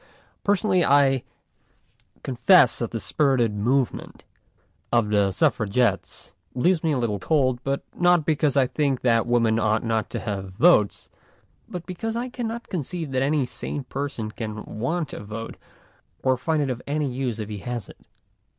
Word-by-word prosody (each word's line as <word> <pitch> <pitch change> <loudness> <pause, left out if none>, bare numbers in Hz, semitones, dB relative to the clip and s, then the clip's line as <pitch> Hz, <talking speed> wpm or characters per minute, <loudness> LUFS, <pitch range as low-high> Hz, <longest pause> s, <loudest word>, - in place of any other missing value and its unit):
Personally, 200 -2 +2
I 135 -3 +4 1.0
confess 130 +2 +4
that 120 - -2
the 115 - -4
spirited 130 -5 +1
movement 120 +5 -1 0.7
of 115 -3 +2
the 100 -2 +2
Suffragettes 105 0 0 0.2
leaves 170 +6 +2
me 160 - +2
a - - 0
little 110 -5 -1
cold, 130 - +1 0.4
not 175 -3 +3
because 150 -3 +1
I 135 - +5
think 140 -1 -1
that 115 -2 +2
women 115 -2 +2
ought 110 0 +1
not 115 -1 -1
to - - -4
have 95 -3 -5
votes, 110 - +3 0.6
but 175 -1 -6
because 225 +5 -4
I 245 +2 -2
can 245 -2 -4
not 235 +1 -6
conceive 165 -2 -4
that 130 -1 0
any 140 0 +1
sane 125 +3 -5
person 130 -4 -4
can 110 -1 -6
want 150 +8 -3
a - - -7
vote 110 +2 -7 0.7
or 130 -1 +3
find 150 +4 0
it 135 - -1
of 125 0 -5
any 150 0 0
use 125 -3 -2
if 105 -1 -5
he 105 -1 -5
has 120 0 -5
it. - - -15
130 Hz, 160 wpm, -24 LUFS, 115-155 Hz, 1.0 s, I